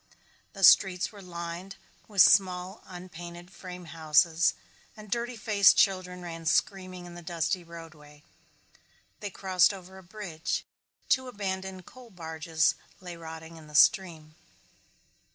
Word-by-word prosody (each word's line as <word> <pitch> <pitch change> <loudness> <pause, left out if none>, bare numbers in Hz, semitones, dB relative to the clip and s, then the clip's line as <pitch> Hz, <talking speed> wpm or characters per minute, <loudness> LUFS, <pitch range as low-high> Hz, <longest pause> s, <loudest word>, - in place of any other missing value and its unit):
The 195 - -7
streets 185 0 +6
were 205 -2 -12
lined 170 +1 -7 0.3
with 200 -3 +6
small 185 +1 +3
unpainted 175 -1 -10
frame 180 -2 -10
houses 160 +1 +2 0.4
and 215 -1 -12
dirty 235 +1 -2
faced 205 -3 +5
children 185 -2 +1
ran 165 -1 -7
screaming 185 -1 0
in 175 - -10
the 175 - -9
dusty 175 +2 -2
roadway. 155 -3 -13 1.0
They 205 - -5
crossed 185 -1 +2
over 190 0 -12
a - - -15
bridge. 175 -4 -4 0.4
Two 260 0 +2
abandoned 190 -4 -5
coal 255 -2 -14
barges 160 -3 0 0.3
lay 180 -2 -8
rotting 160 0 -10
in 155 -1 -13
the 150 - -12
stream. 160 -3 +3
180 Hz, 130 wpm, -28 LUFS, 165-190 Hz, 1.0 s, streets